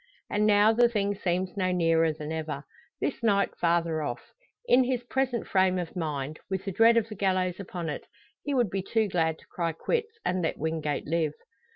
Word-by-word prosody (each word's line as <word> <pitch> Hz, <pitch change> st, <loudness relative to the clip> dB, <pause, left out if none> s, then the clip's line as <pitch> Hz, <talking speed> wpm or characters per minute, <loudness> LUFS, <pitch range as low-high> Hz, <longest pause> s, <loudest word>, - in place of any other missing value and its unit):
And 210 Hz, +1 st, +2 dB
now 210 Hz, +1 st, +5 dB
the 240 Hz, +1 st, +5 dB
thing 205 Hz, -3 st, 0 dB
seems 185 Hz, -1 st, -2 dB
no 185 Hz, -2 st, 0 dB
nearer 165 Hz, -2 st, +3 dB
than 155 Hz, 0 st, -6 dB
ever 155 Hz, -3 st, -4 dB, 0.4 s
this 275 Hz, -, -2 dB
night 200 Hz, -3 st, +2 dB
farther 170 Hz, -2 st, +1 dB
off. 130 Hz, -5 st, -5 dB, 0.3 s
In 255 Hz, -, +5 dB
his 250 Hz, -1 st, -1 dB
present 250 Hz, -2 st, -1 dB
frame 185 Hz, -1 st, +2 dB
of 175 Hz, -1 st, -4 dB
mind 155 Hz, -3 st, -3 dB
with 190 Hz, 0 st, -3 dB
the 195 Hz, -, -2 dB
dread 230 Hz, +4 st, +5 dB
of 225 Hz, -2 st, +2 dB
the 220 Hz, -, -7 dB
gallows 185 Hz, -2 st, 0 dB
upon 180 Hz, -3 st, -5 dB
it 150 Hz, -, -5 dB, 0.3 s
he 285 Hz, -, -2 dB
would 240 Hz, -7 st, +2 dB
be 195 Hz, -, -1 dB
too 220 Hz, +3 st, +1 dB
glad 160 Hz, -4 st, 0 dB
to -, -, -20 dB
cry 170 Hz, -2 st, -2 dB
quits, 455 Hz, -, -2 dB
and 185 Hz, -, 0 dB
let 160 Hz, -, -1 dB
Wingate 160 Hz, -1 st, -2 dB
live! 160 Hz, -1 st, 0 dB
185 Hz, 200 wpm, -28 LUFS, 165-215 Hz, 0.4 s, now